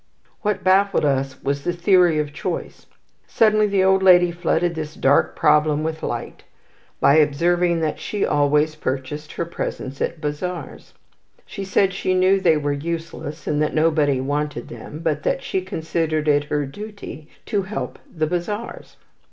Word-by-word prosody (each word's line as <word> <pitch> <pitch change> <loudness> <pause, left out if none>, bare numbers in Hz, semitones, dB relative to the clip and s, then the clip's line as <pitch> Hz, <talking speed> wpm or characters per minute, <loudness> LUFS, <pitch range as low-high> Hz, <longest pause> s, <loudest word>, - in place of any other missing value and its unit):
What 210 -1 -1
baffled 190 -2 +3
us 135 -2 -1
was 140 +1 -1
the 175 - 0
theory 175 -2 +4
of 150 -1 -2
choice. 170 +3 -5 0.4
Suddenly 215 -1 +3
the 195 -2 +2
old 190 0 +4
lady 180 -2 +6
flooded 175 0 0
this 155 -1 -6
dark 135 +2 +2
problem 150 0 +3
with 160 0 -3
light - - -5 0.6
by 140 - +5
observing 170 +3 +2
that 155 -2 -1
she 210 - -2
always 150 +1 +2
purchased 150 +1 -4
her 170 - -3
presents 140 -4 -5
at 170 - -2
bazaars. 160 +4 -5 0.5
She 200 - -7
said 190 0 +2
she 185 -1 -1
knew 185 +1 +4
they 165 -4 +4
were 145 -1 -1
useless, 160 0 -5
and 150 0 0
that 150 - 0
nobody 155 -4 +2
wanted 145 -1 -3
them, 130 +7 -9
but 155 -3 0
that - - -1
she 190 - -1
considered 160 -3 -2
it 145 -1 +3
her 145 0 -1
duty 200 -1 -9 0.2
to 205 - 0
help 195 +3 -5
the 155 -2 -1
bazaars. 180 +7 -4
160 Hz, 160 wpm, -22 LUFS, 150-185 Hz, 0.6 s, lady